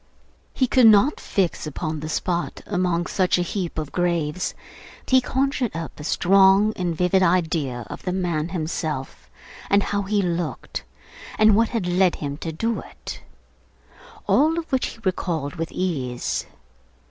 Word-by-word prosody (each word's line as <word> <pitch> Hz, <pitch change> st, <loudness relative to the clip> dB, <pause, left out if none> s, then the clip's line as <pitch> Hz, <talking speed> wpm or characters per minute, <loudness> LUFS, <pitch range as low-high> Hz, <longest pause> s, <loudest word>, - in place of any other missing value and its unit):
He 260 Hz, -, +3 dB
could 250 Hz, -1 st, +5 dB
not 220 Hz, +7 st, +5 dB
fix 180 Hz, -5 st, -1 dB
upon 155 Hz, +1 st, -4 dB
the 155 Hz, +1 st, -5 dB
spot 175 Hz, +2 st, -2 dB
among 180 Hz, -3 st, 0 dB
such 185 Hz, 0 st, +1 dB
a 180 Hz, -, +1 dB
heap 175 Hz, -1 st, -4 dB
of 155 Hz, -2 st, -3 dB
graves, 175 Hz, -2 st, -1 dB, 0.5 s
but -, -, -10 dB
he 260 Hz, 0 st, +6 dB
conjured 265 Hz, -, -1 dB
up 165 Hz, -2 st, -6 dB
a -, -, -7 dB
strong 195 Hz, +5 st, +4 dB
and 175 Hz, -2 st, -2 dB
vivid 180 Hz, +3 st, +2 dB
idea 160 Hz, -9 st, +1 dB
of -, -, -8 dB
the 180 Hz, -, -2 dB
man 175 Hz, -4 st, -1 dB
himself, 155 Hz, -5 st, -4 dB, 0.4 s
and 200 Hz, 0 st, +4 dB
how 200 Hz, 0 st, -1 dB
he 205 Hz, +1 st, 0 dB
looked, 170 Hz, -2 st, -3 dB, 0.5 s
and 215 Hz, -1 st, +6 dB
what 225 Hz, +1 st, +3 dB
had 225 Hz, -6 st, -2 dB
led 180 Hz, 0 st, +3 dB
him 140 Hz, -1 st, -4 dB
to 165 Hz, -, -4 dB
do 225 Hz, +8 st, -1 dB
it; -, -, -9 dB, 1.0 s
all 315 Hz, +3 st, +3 dB
of 335 Hz, -1 st, -4 dB
which 260 Hz, -1 st, +1 dB
he -, -, -10 dB
recalled 165 Hz, -6 st, -2 dB
with 165 Hz, 0 st, -3 dB
ease. 135 Hz, -10 st, -2 dB
180 Hz, 160 wpm, -23 LUFS, 160-200 Hz, 1.0 s, he